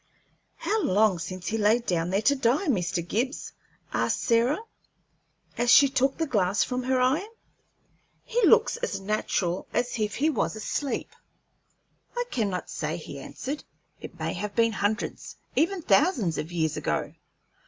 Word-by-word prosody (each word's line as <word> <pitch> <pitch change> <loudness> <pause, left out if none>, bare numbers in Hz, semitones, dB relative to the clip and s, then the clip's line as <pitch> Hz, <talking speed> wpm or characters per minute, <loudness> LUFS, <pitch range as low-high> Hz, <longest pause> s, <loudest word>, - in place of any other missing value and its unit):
"How 435 +1 -1
long 200 - +3
since 185 +2 -6
he 225 - -1
laid 220 +3 +3
down 170 -3 0
there 195 +3 0
to 280 - +4
die, 265 +7 +1
Mr. 180 - 0
Gibbs?" 255 +8 -2 0.4
asked - - +1
Sarah, 235 +4 +3 1.0
as 240 0 +2
she 280 +3 +8
took 270 0 +1
the 325 - 0
glass 205 -7 +2
from 250 0 -2
her 255 +1 +1
eye. 270 +10 +2 1.0
"He 485 0 -1
looks - - +5
as 485 - -3
natural 195 -3 -1
as 245 -1 -1
if 210 -1 -1
he 295 - +1
was 230 - -1
asleep." 260 +5 -3 1.1
"I 485 - +1
cannot 200 -6 -1
say," - - -3
he - - -8
answered. 285 +3 -6 0.4
"It - - -10
may - - -2
have 205 +2 -5
been 230 -1 +3
hundreds, 205 0 -2 0.2
even 350 +1 +1
thousands, 215 - +2
of 160 - -5
years 160 -3 0
ago." - - -2
230 Hz, 155 wpm, -27 LUFS, 195-275 Hz, 1.1 s, she